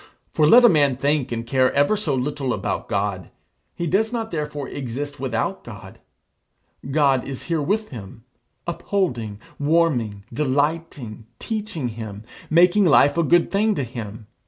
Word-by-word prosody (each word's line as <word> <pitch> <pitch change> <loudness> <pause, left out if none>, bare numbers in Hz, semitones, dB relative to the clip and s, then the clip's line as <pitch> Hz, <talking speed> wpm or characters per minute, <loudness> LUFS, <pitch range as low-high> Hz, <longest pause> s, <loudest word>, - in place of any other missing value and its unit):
For 150 - +3
let 245 +9 +8
a - - +10
man 145 - +3
think 140 -1 0
and 115 0 -3
care 130 +1 +2
ever 145 +9 +3
so 165 -10 -1
little 135 -1 -1
about - - -3
God, 100 -4 -2 0.5
he 170 - -3
does 210 +7 +1
not 225 -2 -3
therefore 150 -3 -4
exist 140 +3 -5
without 125 -4 -2
God. - - -11 0.9
God 135 -3 +3
is 135 -2 -6
here 165 -2 -1
with 210 +8 -1
him, 110 -2 -10 0.4
upholding, 125 - -2 0.2
warming, 145 -10 +1
delighting, 145 -5 -2
teaching 210 - -4
him 110 -2 -7 0.3
making 180 +5 +5
life 145 -3 +5
a 170 - +2
good 170 +2 +3
thing 210 +2 +2
to 140 - -1
him. 115 -3 -7
145 Hz, 150 wpm, -22 LUFS, 120-170 Hz, 0.9 s, a